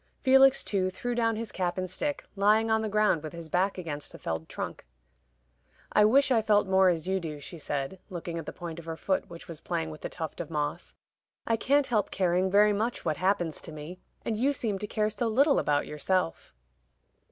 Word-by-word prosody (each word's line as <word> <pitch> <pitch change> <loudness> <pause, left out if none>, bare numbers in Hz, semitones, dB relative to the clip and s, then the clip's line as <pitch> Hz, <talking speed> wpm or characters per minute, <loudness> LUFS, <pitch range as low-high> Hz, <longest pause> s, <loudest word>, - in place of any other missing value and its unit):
Felix, 270 0 +6
too, 190 -3 0
threw 245 +6 -4
down 230 -1 +1
his 225 0 -5
cap 180 -1 -2
and 185 0 -1
stick, 285 +11 -3
lying 215 +3 +3
on 220 0 +3
the 220 - -2
ground 210 -6 +2
with 155 +1 -7
his 170 -1 -8
back 185 +5 +1
against 155 -5 -5
the - - -10
felled 80 0 -4
trunk. - - -5 1.1
"I 210 - +6
wish 265 +5 +4
I 230 -3 +4
felt 210 -1 +3
more 190 -1 +4
as 170 -1 -1
you 190 0 +1
do," 155 -4 -6
she 165 +4 -8
said, 145 +4 -3
looking 170 -2 -5
at 160 - -8
the - - -3
point 170 -1 -7
of 165 - -11
her 165 -1 -5
foot, 190 +2 -1
which 170 +1 -11
was 165 -4 -8
playing 165 -2 -2
with 155 - -11
a - - -3
tuft 160 +1 -5
of 165 - -7
moss. 150 +2 -3 0.5
"I 230 - +2
can't 280 +5 +2
help 215 -5 +1
caring 185 0 +1
very 205 +2 +5
much 225 +4 -2
what 155 - 0
happens 180 -4 0
to - - -8
me. 155 +4 -8 0.3
And 225 - 0
you 265 +6 +2
seem 215 -7 -2
to 210 - -4
care 215 0 0
so 215 +3 -1
little 275 +6 +4
about 145 -1 +1
yourself." 165 - -2
190 Hz, 220 wpm, -28 LUFS, 165-215 Hz, 1.1 s, Felix